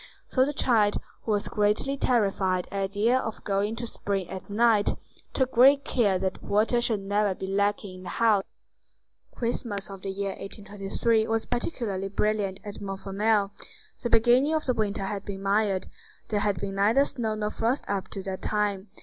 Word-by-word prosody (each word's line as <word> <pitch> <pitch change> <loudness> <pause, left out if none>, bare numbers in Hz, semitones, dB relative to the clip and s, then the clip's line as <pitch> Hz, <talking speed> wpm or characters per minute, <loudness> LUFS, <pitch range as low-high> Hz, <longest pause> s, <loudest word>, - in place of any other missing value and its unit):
So 260 0 +3
the 290 - -1
child, 225 -7 +2 0.3
who 225 - 0
was 205 -1 0
greatly 210 +6 +1
terrified 195 -8 +1
at 195 -1 -2
the 215 +3 +2
idea 255 - +4
of 225 -4 -5
going 205 +2 0
to 235 - -5
the - - -3
spring 195 -4 -3
at 190 +1 -7
night, 215 0 +3 0.4
took 260 -1 0
great 275 +3 +6
care 205 -6 +2
that 190 0 -3
water 220 +4 +2
should 225 -4 0
never 205 0 +1
be 190 - -5
lacking 200 0 -1
in 185 - -11
the - - -5
house. 220 -4 +3 0.9
Christmas 230 -4 -2
of 195 -1 -9
the 195 - -4
year 195 +1 -2
1823 205 +3 -1
was 225 0 0
particularly 230 - -2
brilliant 200 -1 0
at 205 0 -8
Montfermeil. 200 +1 0 0.5
The 240 - -1
beginning 245 +7 +4
of 310 - -1
the 255 - +2
winter 210 -3 -1
had 200 0 -3
been 195 -1 -6
mild; 200 -1 +1 0.4
there 210 - +1
had 200 -3 0
been 195 +1 -4
neither 225 +8 +4
snow 220 -5 -1
nor 210 0 -2
frost 235 +5 0
up 195 -2 -2
to 195 - -6
that 190 -1 -5
time. 205 -2 -1
205 Hz, 185 wpm, -27 LUFS, 195-230 Hz, 0.9 s, great